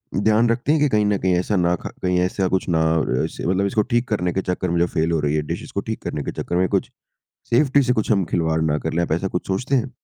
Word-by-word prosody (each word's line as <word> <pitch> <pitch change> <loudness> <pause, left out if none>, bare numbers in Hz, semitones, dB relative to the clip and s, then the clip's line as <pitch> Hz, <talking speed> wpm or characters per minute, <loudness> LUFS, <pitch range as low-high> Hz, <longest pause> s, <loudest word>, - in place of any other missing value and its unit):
ध्यान 110 +3 +3
रखते 120 +5 0
हैं 155 -1 +2
कि 150 - +3
कहीं 105 -3 +2
न 105 -1 +2
कहीं 95 -1 +1
ऐसा 95 +4 0
ना 90 -1 +2
ख - - -5
कहीं 90 -1 +1
ऐसा 90 +1 0
कुछ 95 - -1
ना 80 - +3 0.4
इसे - - -5
मतलब 95 +2 +1
इसको 105 +2 +1
ठीक 120 +1 +2
करने 90 -5 0
के 95 - 0
चक्कर 90 0 -2
में 85 0 0
जो 85 - +3
फेल 80 -1 +1
हो 80 - +1
रही 75 0 0
है 75 - +1
डिश - - -4
इसको - - -4
ठीक - - -3
करने 75 - -3
के - - -4
चक्कर 85 - -3
में 90 +1 +2
कुछ - - 0 0.6
सेफ्टी 140 +3 +4
से 125 -1 +2
कुछ 110 -3 -1
हम 95 -3 +2
खिलवाड़ 80 -1 +1
ना 75 -1 +1
कर - - -4
लें, 85 - +1
आप 85 - -2
ऐसा 90 +4 0
कुछ 90 - -4
सोचते 125 +8 -1
हैं? 130 0 0
95 Hz, 285 wpm, -21 LUFS, 85-110 Hz, 0.6 s, सेफ्टी